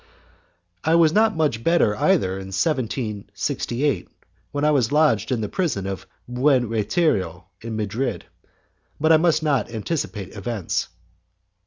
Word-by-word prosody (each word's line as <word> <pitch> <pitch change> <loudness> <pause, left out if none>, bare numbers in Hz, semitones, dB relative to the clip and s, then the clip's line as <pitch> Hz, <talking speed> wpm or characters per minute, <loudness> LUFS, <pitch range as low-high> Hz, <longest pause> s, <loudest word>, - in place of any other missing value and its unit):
I 160 +1 +3
was 165 -2 +5
not 220 0 +3
much 145 -8 0
better 165 -10 +3
either 95 -2 +2
in 95 - -7
1768, 115 - -2 0.4
when 145 +1 -1
I 150 - +4
was 130 -5 +2
lodged 150 -8 +3
in 120 -3 0
the 105 - -2
prison 155 - -1
of 95 -1 -5 0.2
Buen 125 0 +2
Retiro, 105 - 0
in 115 -1 -5
Madrid, 110 +3 -2 0.7
but 160 +2 +3
I 160 - +8
must 160 -1 +2
not 140 -8 +1
anticipate 105 - -4
events. 110 -3 -2
120 Hz, 135 wpm, -23 LUFS, 105-150 Hz, 0.7 s, I